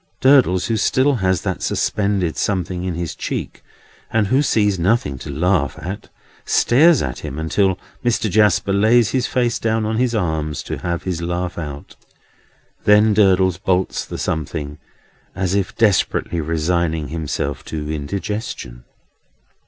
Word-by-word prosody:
Durdles, 125 Hz, -10 st, +4 dB
who 115 Hz, +1 st, 0 dB
still 130 Hz, +6 st, +2 dB
has 95 Hz, -4 st, 0 dB
that -, -, -3 dB
suspended 100 Hz, -5 st, 0 dB
something 90 Hz, -2 st, -2 dB
in 90 Hz, -2 st, -2 dB
his 85 Hz, -1 st, -4 dB
cheek, -, -, -5 dB, 0.5 s
and 110 Hz, -2 st, +1 dB
who 130 Hz, +8 st, +2 dB
sees 105 Hz, -8 st, +1 dB
nothing 85 Hz, -, +1 dB
to -, -, -8 dB
laugh 75 Hz, 0 st, 0 dB
at, 100 Hz, +4 st, -7 dB, 0.3 s
stares 150 Hz, +4 st, +4 dB
at 65 Hz, -, -4 dB
him 70 Hz, -, -6 dB
until 95 Hz, +4 st, +1 dB, 0.3 s
Mr. 120 Hz, -2 st, +1 dB
Jasper 105 Hz, -1 st, +2 dB
lays 110 Hz, +1 st, +4 dB
his 125 Hz, 0 st, 0 dB
face 120 Hz, -2 st, 0 dB
down 110 Hz, -1 st, 0 dB
on 110 Hz, +1 st, -1 dB
his 120 Hz, -1 st, +1 dB
arms 80 Hz, -6 st, -2 dB
to -, -, -5 dB
have 85 Hz, -1 st, -3 dB
his 90 Hz, -3 st, -3 dB
laugh 85 Hz, +1 st, -3 dB
out. 75 Hz, -3 st, -7 dB, 0.9 s
Then 105 Hz, +1 st, +5 dB
Durdles 95 Hz, -3 st, +3 dB
bolts 95 Hz, -1 st, 0 dB
the -, -, -7 dB
something, 75 Hz, -1 st, -3 dB, 0.6 s
as 95 Hz, -1 st, -1 dB
if 100 Hz, -2 st, -1 dB
desperately 100 Hz, -5 st, +1 dB
resigning 80 Hz, -1 st, -1 dB
himself 75 Hz, -3 st, -3 dB
to 75 Hz, -1 st, -5 dB
indigestion. 75 Hz, -, -5 dB
95 Hz, 145 wpm, -20 LUFS, 80-110 Hz, 0.9 s, Then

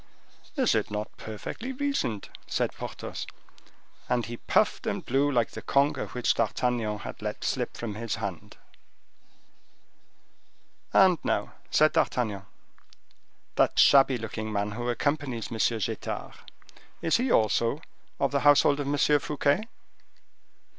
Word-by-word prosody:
"Is 260 Hz, -4 st, +3 dB
it 110 Hz, -2 st, 0 dB
not 105 Hz, 0 st, -4 dB
powerfully 110 Hz, -, -6 dB
reasoned?" 265 Hz, -, -2 dB, 0.2 s
said -, -, -1 dB
Porthos: -, -, -6 dB, 0.8 s
and 120 Hz, -2 st, +1 dB
he 120 Hz, +1 st, -6 dB
puffed -, -, +1 dB
and -, -, -2 dB
blew 135 Hz, +3 st, +2 dB
like 120 Hz, -4 st, +1 dB
the -, -, -7 dB
conger 140 Hz, +1 st, +1 dB
which 125 Hz, -1 st, +1 dB
D'Artagnan 115 Hz, -1 st, 0 dB
had -, -, -8 dB
let -, -, -4 dB
slip -, -, -2 dB
from 115 Hz, -3 st, -4 dB
his 115 Hz, +1 st, -3 dB
hand. 100 Hz, -6 st, -6 dB, 2.3 s
"And 185 Hz, -4 st, +5 dB
now," -, -, -1 dB, 0.2 s
said 155 Hz, +1 st, +4 dB
D'Artagnan, 105 Hz, -6 st, 0 dB, 1.1 s
"that -, -, +3 dB
shabby 135 Hz, -2 st, +6 dB
looking 110 Hz, -1 st, -5 dB
man, 105 Hz, 0 st, -1 dB
who 120 Hz, +3 st, -3 dB
accompanies 135 Hz, -2 st, -1 dB
M. 115 Hz, -, -4 dB, 0.2 s
Getard, 100 Hz, -, -4 dB, 0.7 s
is 165 Hz, -, +3 dB
he 250 Hz, +1 st, 0 dB
also 115 Hz, +5 st, +2 dB, 0.4 s
of 140 Hz, -, +1 dB
the 140 Hz, -, +2 dB
household 145 Hz, 0 st, +5 dB
of 145 Hz, -, -2 dB
M. 145 Hz, +1 st, 0 dB, 0.2 s
Fouquet?" 150 Hz, +8 st, 0 dB
120 Hz, 125 wpm, -27 LUFS, 110-145 Hz, 2.3 s, shabby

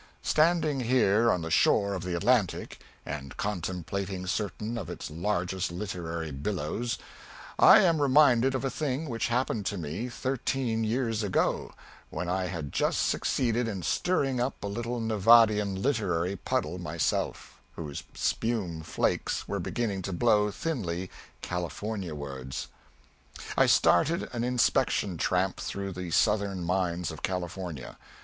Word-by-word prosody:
Standing 155 Hz, -3 st, +2 dB
here 115 Hz, -2 st, +3 dB
on 90 Hz, -, 0 dB
the 80 Hz, -, -4 dB
shore 100 Hz, +5 st, +3 dB
of 95 Hz, -, -3 dB
the 90 Hz, 0 st, -2 dB
Atlantic 115 Hz, 0 st, +1 dB, 0.3 s
and 70 Hz, -2 st, -6 dB
contemplating 95 Hz, 0 st, -3 dB
certain 105 Hz, +4 st, -2 dB
of 100 Hz, -8 st, -5 dB
its 90 Hz, -, -6 dB
largest 90 Hz, +1 st, -1 dB
literary 85 Hz, -4 st, -4 dB
billows, 95 Hz, -, -2 dB, 0.6 s
I -, -, +9 dB
am 165 Hz, -5 st, +3 dB
reminded 135 Hz, -2 st, +5 dB
of 130 Hz, -, -2 dB
a 135 Hz, -, -1 dB
thing 150 Hz, +1 st, -2 dB
which 115 Hz, -3 st, -1 dB
happened 120 Hz, -4 st, 0 dB
to 100 Hz, -, -2 dB
me 90 Hz, +9 st, -4 dB
thirteen 125 Hz, -2 st, -1 dB
years 115 Hz, -1 st, 0 dB
ago, 100 Hz, -3 st, 0 dB, 0.4 s
when 90 Hz, -, -4 dB
I 90 Hz, +1 st, 0 dB
had 80 Hz, -6 st, -5 dB
just -, -, +1 dB
succeeded 120 Hz, -1 st, 0 dB
in 100 Hz, -5 st, -4 dB
stirring 135 Hz, -, +1 dB
up 125 Hz, +2 st, -2 dB
a -, -, -2 dB
little 120 Hz, +4 st, -3 dB
Nevadian 110 Hz, -2 st, +4 dB
literary 100 Hz, -7 st, 0 dB
puddle 90 Hz, -1 st, -2 dB
myself, 85 Hz, -2 st, -2 dB
whose 75 Hz, -4 st, -5 dB
spume 100 Hz, -9 st, -1 dB
flakes 80 Hz, -, -1 dB
were -, -, -2 dB
beginning 105 Hz, -5 st, -2 dB
to 95 Hz, -, -4 dB
blow 105 Hz, +1 st, +3 dB
thinly 95 Hz, -, -3 dB, 0.3 s
Californiawards. 85 Hz, -8 st, -4 dB, 0.9 s
I -, -, +5 dB
started 155 Hz, -, +3 dB
an 120 Hz, -1 st, -2 dB
inspection 120 Hz, -7 st, +1 dB
tramp 90 Hz, +1 st, +1 dB
through 100 Hz, 0 st, -4 dB
the 90 Hz, -1 st, -5 dB
southern 100 Hz, 0 st, +1 dB
mines 90 Hz, -1 st, -1 dB
of 80 Hz, -, -9 dB
California. 90 Hz, -5 st, -4 dB
100 Hz, 135 wpm, -28 LUFS, 90-120 Hz, 0.9 s, I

